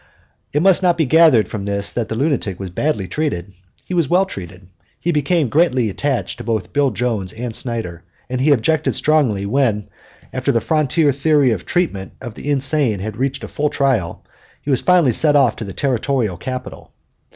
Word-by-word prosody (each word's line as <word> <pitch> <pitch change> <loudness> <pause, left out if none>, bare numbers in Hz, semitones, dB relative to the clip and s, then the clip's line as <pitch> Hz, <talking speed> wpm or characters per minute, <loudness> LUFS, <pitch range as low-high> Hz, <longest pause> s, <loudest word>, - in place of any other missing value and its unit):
It 150 +3 +1
must 190 -1 +5
not 175 -2 +2
be 160 - +2
gathered 145 - +5
from 100 -3 -5
this 100 0 -1
that 120 -2 -2
the 110 - -3
lunatic 130 - -1
was 95 -2 -6
badly 105 - -1
treated. 100 - -3 0.3
He - - -6
was 170 -6 +1
well 185 +2 +3
treated. 90 - -9 0.3
He 175 - -1
become 150 0 +1
greatly 130 - +2
attached 135 +4 -2
to - - -6
both 110 -6 -3
Bill 140 -1 +2
Jones 110 -5 -2
and 115 +1 -4
Snyder, 115 -9 -3 0.3
and 125 0 -3
he 145 - +3
objected 150 +5 +1
strongly 130 -11 +2
when, 110 -3 0 0.4
after - - 0
the 115 - +2
frontier 155 +3 +1
theory 140 -1 +2
of 100 -6 -4
treatment 100 - -1
of 120 -4 -8
the 145 - -7
insane 140 -5 +1
had 105 +2 -5
received 135 +2 -2
a - - -5
full 150 0 -1
trial, 125 -14 -1 0.4
he 145 - -2
was 130 - +2
finally 175 -9 +4
sent 150 +4 +4
off 130 -5 +3
to 110 - -5
the 100 - -7
territorial 125 -3 -1
capital. 130 +7 -7
130 Hz, 190 wpm, -19 LUFS, 110-150 Hz, 0.4 s, must